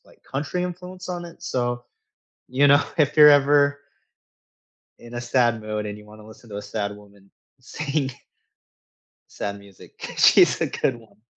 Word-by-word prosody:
like, - - -23
country 145 +6 -3
influence 180 +1 -7
on 175 -1 -4
it, 170 -1 -13
so, 120 -1 -2 0.7
you 140 +3 +3
know, 145 +1 +5
if 150 -1 +2
you're 150 -1 +9
ever 145 0 +4 1.2
in 120 0 -13
a 120 - -3
sad 120 -2 +1
mood 105 0 -4
and 105 0 -6
you 105 - -15
wanna 105 0 -15
listen 110 +1 -16
to 100 - -6
a 105 - -5
sad 100 0 -4
woman 100 -1 -19 0.3
sing 140 +1 -3 1.2
sad 100 0 -5
music, 100 -1 -12
she's - - +5
a - - +1
good 130 - -1
one. 105 -2 -20
120 Hz, 160 wpm, -23 LUFS, 105-145 Hz, 1.2 s, you're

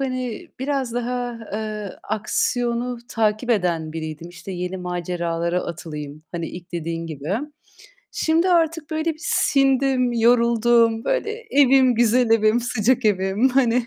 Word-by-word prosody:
hani, 255 -3 -3
biraz 265 -2 -2
daha, 245 -1 -3
eee, 215 -2 -4
aksiyonu 240 +3 -1
takip 220 0 0
eden 170 -7 0
biriydim. 160 +1 -6
İşte, 175 +2 -9
yeni 180 +1 -4
maceralara 175 -1 -2
atılayım. 155 -3 -7
Hani, 170 -2 -3
ilk 175 0 -10
dediğin 165 0 -3
gibi. 155 +3 -4 0.8
Şimdi 330 +3 +2
artık 325 -3 +1
böyle 315 +1 -1
bir 310 - -20
sindim, 270 -4 +2
yoruldum. 235 -1 +3
Böyle - - 0 0.2
evim, 265 -2 +5
güzel 240 +1 +3
evim, 225 +1 +4
sıcak 245 +1 +1
evim. 200 +4 +2
Hani, 245 -2 +2
230 Hz, 125 wpm, -22 LUFS, 180-255 Hz, 0.8 s, evim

